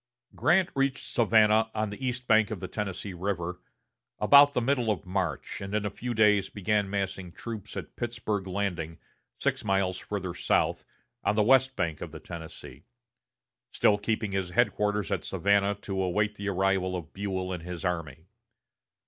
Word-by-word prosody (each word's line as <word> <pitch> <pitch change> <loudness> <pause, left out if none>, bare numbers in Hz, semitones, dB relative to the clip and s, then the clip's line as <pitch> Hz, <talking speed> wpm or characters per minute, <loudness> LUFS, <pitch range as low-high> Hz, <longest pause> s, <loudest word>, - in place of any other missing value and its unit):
Grant 175 +2 +3
reached 135 -1 0
Savannah, 110 -1 +4
on 110 -1 -1
the 105 - -8
east 125 0 -2
bank 110 -2 +4
of 110 -4 -4
the 95 - -5
Tennessee 100 -1 -4
River, 90 -1 -3 0.6
about 140 +6 +7
the - - +2
middle 125 -1 +1
of 105 -2 -1
March, 90 -5 -3
and 100 +1 -4
in 105 -1 0
a 105 - -2
few 120 +3 -4
days 105 -3 +4
began 105 0 0
massing 95 -2 -3
troops 110 +1 -7
at - - -7
Pittsburg 110 -5 -3
Landing, 90 -4 -2 0.4
six 135 -2 -1
miles 95 -2 +1
farther 95 -4 -4
south, - - +1 0.4
on 105 - +2
the 105 - +4
west 130 +3 +4
bank 80 -3 -2
of 85 - -6
the 80 - -8
Tennessee; 80 -4 -10 0.9
still 105 -1 +3
keeping 110 -1 -1
his 95 -2 -1
headquarters 105 -1 +1
at 95 -5 -1
Savannah, 100 +2 +2
to 95 -1 -2
await 105 +3 +1
the 100 -1 -4
arrival 95 -1 +1
of 85 -2 -7
Buell 95 -2 -3
and 90 - -5
his 90 0 -6
army. 80 -3 -3
100 Hz, 165 wpm, -28 LUFS, 90-110 Hz, 0.9 s, about